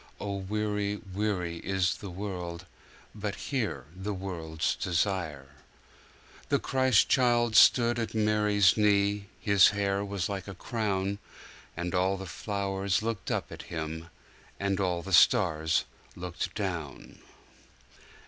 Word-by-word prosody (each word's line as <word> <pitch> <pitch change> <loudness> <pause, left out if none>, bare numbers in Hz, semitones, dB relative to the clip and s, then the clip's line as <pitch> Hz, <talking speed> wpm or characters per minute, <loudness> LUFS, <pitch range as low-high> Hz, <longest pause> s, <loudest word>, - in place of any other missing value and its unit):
(O 100 -1 -3
weary, 105 +1 -1 0.2
weary 95 -5 -1
is 95 0 0
the 100 - -8
world, 90 -3 -5 0.5
But 105 -1 -4
here 105 - -3
the 100 +2 -4
world's 85 -4 -2
desire.)4. 85 -6 -5
The - - +3
Christ 130 -4 +3
child 120 -3 +3
stood 120 0 +6
at 115 -1 -3
Mary's 105 -3 +3
knee, 100 -1 +2
His 100 -2 +6
hair 100 -1 0
was 100 -3 -2
like 100 -1 -5
a 100 - -7
crown. 100 -2 -2 0.6
And 85 0 -3
all 95 +1 +2
the 95 - -7
flowers 100 +1 -2
looked 115 -3 -3
up - - -2
at - - -7
Him, 80 0 -5 0.5
And 100 0 0
all 90 -3 0
the 95 +1 -5
stars 80 -7 +4 0.3
looked 90 0 -5
down. 85 -9 -5
100 Hz, 125 wpm, -29 LUFS, 90-105 Hz, 0.6 s, stood